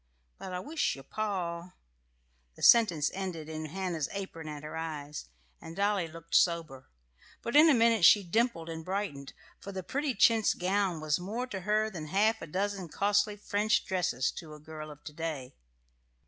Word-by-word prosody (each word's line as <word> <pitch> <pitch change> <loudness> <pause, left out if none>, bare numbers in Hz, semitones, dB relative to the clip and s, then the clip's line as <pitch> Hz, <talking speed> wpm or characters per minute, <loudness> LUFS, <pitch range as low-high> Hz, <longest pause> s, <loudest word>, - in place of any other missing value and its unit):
But 185 - -7
I 180 - -3
wisht 295 - -1
your 135 - -11
pa 180 -1 -3 0.4
" - - -42
The - - -11
sentence 180 -11 +6
ended 185 -5 -5
in 155 0 -5
Hannah's 170 -2 -3
apron 190 -5 -6
at 150 -1 -7
her 155 +1 -7
eyes, 150 -2 -5 0.4
and 165 - -9
Dolly 200 -3 +1
looked 165 +1 -12
sober; 160 -7 +1 0.5
but 235 - -3
in 310 +2 +8
a 290 - +6
minute 230 -4 +3
she 205 +4 +8
dimpled 185 -2 0
and 160 -1 -6
brightened, 185 -7 -4 0.3
for 200 - -8
the 190 -1 -5
pretty 280 - -2
chintz 225 -2 +4
gown 185 -2 0
was 155 0 +1
more 215 +8 -3
to 205 -7 -5
her 215 +3 +1
than 160 -5 -6
half 215 +6 +2
a 165 - -6
dozen 190 +1 -2
costly 205 +3 +1
French 210 +1 +1
dresses 175 -9 0
to 155 -2 -8
a - - -13
girl 155 0 -9
of 150 -1 -13
to 150 - -9
day. 150 -5 -5
180 Hz, 180 wpm, -30 LUFS, 155-205 Hz, 0.5 s, in